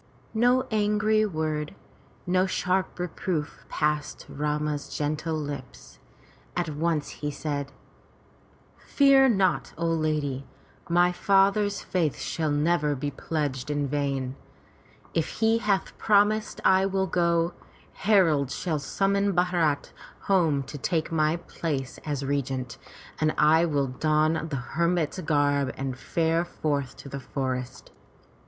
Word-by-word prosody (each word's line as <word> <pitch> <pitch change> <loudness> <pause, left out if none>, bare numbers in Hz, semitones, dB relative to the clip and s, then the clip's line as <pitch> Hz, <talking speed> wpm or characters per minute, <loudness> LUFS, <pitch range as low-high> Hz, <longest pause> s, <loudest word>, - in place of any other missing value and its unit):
No 245 +3 +3
angry 215 0 +2
word, 155 -4 -3 0.5
no 185 +1 +2
sharp 185 0 -1
reproof 175 -3 -3
passed 150 -1 -1
Rama's 150 0 -2
gentle 155 +2 -1
lips. 145 -4 -7 0.6
At 175 -2 0
once 155 0 -1
he 150 - -1
said: 145 -1 -4 1.1
"Fear 275 -1 +5
not, 195 -5 +1
O 170 - -2
lady, 155 -4 -1 0.4
my 175 +1 +4
father's 200 +2 +2
faith 165 -6 0
shall 160 -2 -2
never 150 0 +1
be 145 +2 -3
pledged 140 -2 -3
in 145 -1 0
vain. 135 -2 -2 0.8
If 165 -2 -1
he 225 +1 +2
hath 200 -4 0
promised 210 +1 +2
I 190 +1 +5
will 190 0 0
go. 170 -1 +1 0.4
Heralds 165 -10 +3
shall 160 -5 -1
summon 200 +7 +1
Bharat 175 -5 +1 0.3
home 165 -8 +2
to 140 +2 -8
take 165 +2 -1
my 155 0 +2
place 150 -6 -4
as 145 -3 -3
regent, 135 -3 -2 0.4
and 155 0 +1
I 160 +3 +5
will 145 -4 +1
don 155 +4 +1
the 145 - -3
hermit's 170 +6 -1
garb 145 -4 +1
and 135 -1 -3
fare 165 +5 0
forth 145 -6 -3
to - - -10
the 140 - -5
forest. 130 -1 -4
155 Hz, 120 wpm, -26 LUFS, 145-185 Hz, 1.1 s, Fear